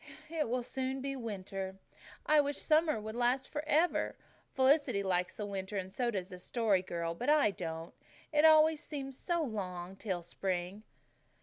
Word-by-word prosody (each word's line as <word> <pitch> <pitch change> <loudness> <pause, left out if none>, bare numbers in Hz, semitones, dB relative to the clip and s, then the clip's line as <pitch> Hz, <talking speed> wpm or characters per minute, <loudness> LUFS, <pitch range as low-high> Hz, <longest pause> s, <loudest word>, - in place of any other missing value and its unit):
"It 315 -7 -1
will 250 +1 0
soon 265 +2 -3
be 275 +1 -3
winter. 195 -5 -5 0.5
I 305 -1 +6
wish 285 0 -2
summer 310 -5 +3
could 220 +1 -6
last 245 +2 +1
forever. 305 +3 +1 0.4
Felicity 265 -5 +3
likes 180 -2 0
the 210 - -3
winter, 195 0 -4
and 190 0 -4
so 245 -2 0
does 190 -5 -3
the 180 - -9
Story 210 -1 +1
Girl, 170 -2 -3
but 245 +11 -2
I 295 -8 +5
don't. 165 -2 -6 0.4
It 300 0 +4
always 315 -1 +6
seems 270 -3 -5
so 340 +4 -1
long 190 - -4
till 190 -4 -3
spring." 180 +2 -3
225 Hz, 165 wpm, -33 LUFS, 190-285 Hz, 0.5 s, I